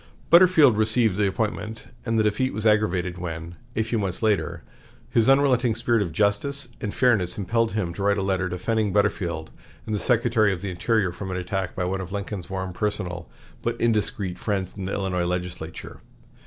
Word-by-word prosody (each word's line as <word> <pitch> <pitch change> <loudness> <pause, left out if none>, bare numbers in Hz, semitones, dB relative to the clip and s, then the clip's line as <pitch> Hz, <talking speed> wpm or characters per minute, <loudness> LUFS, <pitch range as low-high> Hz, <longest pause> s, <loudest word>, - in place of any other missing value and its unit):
Butterfield 170 - +7
received 110 -1 +2
the 105 0 +2
appointment, 110 +2 -3 0.2
and 115 0 +1
the 110 - +4
defeat 105 +3 0
was 110 +1 -3
aggravated 95 -5 +2
when, 85 -1 -5 0.2
a 110 - +2
few 115 0 -1
months 95 0 -2
later, 105 -3 0 0.5
his 115 +1 +3
unrelenting 130 -4 +4
spirit 115 0 +1
of 90 -5 -2
justice 105 - 0
and 105 - -2
fairness 105 -9 +2
impelled 115 +3 0
him 95 -6 -1
to 100 - -6
write 100 0 +2
a 100 - -1
letter 95 -1 0
defending 105 +4 0
Butterfield 85 -6 0 0.3
and 110 - -3
the 105 - 0
Secretary 115 -3 +3
of 95 - -3
the 100 - -3
Interior 100 +1 +1
from 95 +2 -7
an 90 - -2
attack 95 0 -3
by 90 - -1
one 95 +1 -2
of 95 0 -7
Lincoln's 100 -2 -4
warm 95 -1 -4
personal 90 -4 -3 0.3
but - - -2
indiscreet 105 -5 0
friends 100 -4 -2
in 100 -2 -5
the 95 - -3
Illinois 90 -3 -1
legislature. 90 -2 -5
100 Hz, 185 wpm, -24 LUFS, 90-110 Hz, 0.5 s, Butterfield